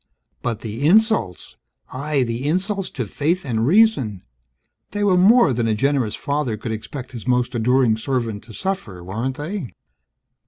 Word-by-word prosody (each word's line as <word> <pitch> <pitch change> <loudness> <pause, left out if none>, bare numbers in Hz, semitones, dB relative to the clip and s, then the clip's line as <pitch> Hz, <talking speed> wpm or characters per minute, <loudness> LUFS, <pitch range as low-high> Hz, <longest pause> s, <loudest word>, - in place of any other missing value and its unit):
But 115 -3 -3
the 115 +6 -2
insults, 215 - +2 0.4
aye, 140 +1 0
the 120 +3 -3
insults 190 +4 -1
to 125 - -4
faith 155 - -1
and 115 -3 0
reason! 145 - +3 0.7
They 205 0 -1
were 195 -3 +4
more 195 - +5
than 115 -1 0
a 110 - +1
generous 130 -2 +1
Father 140 -6 -2
could 110 +1 -5
expect 125 +4 -6
His 120 -1 -8
most 125 -1 +1
adoring 120 0 +3
servant 115 -3 -2
to 120 - -12
suffer, 150 - -4
weren't 115 +8 -3
they? 155 - -5
130 Hz, 155 wpm, -21 LUFS, 115-170 Hz, 0.7 s, more